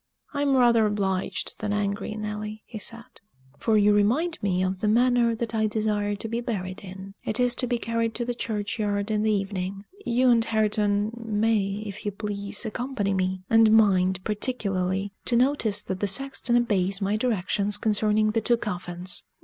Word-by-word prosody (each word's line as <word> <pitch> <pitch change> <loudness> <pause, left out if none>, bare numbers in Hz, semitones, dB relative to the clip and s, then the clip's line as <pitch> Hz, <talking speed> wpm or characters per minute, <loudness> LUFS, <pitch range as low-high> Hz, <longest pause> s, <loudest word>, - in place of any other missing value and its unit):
"I'm 285 -2 +2
rather 235 -3 +5
obliged 195 -3 -1
than 210 -1 -2
angry, 205 +1 -2
Nelly," 210 0 -5
he 220 - -8
said, 230 +3 -5 0.4
"for 220 -2 +2
you 210 0 +5
remind 255 +12 +1
me 185 -2 +1
of 185 0 -2
the 210 - -1
manner 240 +1 +3
that 230 0 -4
I 220 -1 +1
desire 210 -1 -1
to 215 - -4
be 230 +2 -2
buried 190 -6 -4
in. 190 +1 -9
It 220 - -1
is 245 -1 +4
to 250 - 0
be 240 0 0
carried 230 -1 -2
to 240 - -1
the 245 - -2
churchyard 210 -2 -2
in 210 -1 +1
the 220 - +1
evening. 195 -1 -3 0.2
You 250 -1 +3
and 230 -1 +4
Hareton 210 -1 +1
may, 210 -2 0
if 200 0 -7
you 205 - -2
please, 205 +1 -4
accompany 220 -3 -2
me 185 0 -1
and 225 -1 +5
mind, 190 -4 +3
particularly, 200 -4 -1
to 240 - +1
notice 235 -5 +2
that 190 -1 -4
the 205 - 0
sexton 240 +2 +1
obeys 195 -5 +1
my 200 +1 0
directions 205 -3 +1
concerning 215 0 +1
the 225 +1 0
two 240 +2 +3
coffins! 180 -3 -5
210 Hz, 175 wpm, -25 LUFS, 200-230 Hz, 0.4 s, rather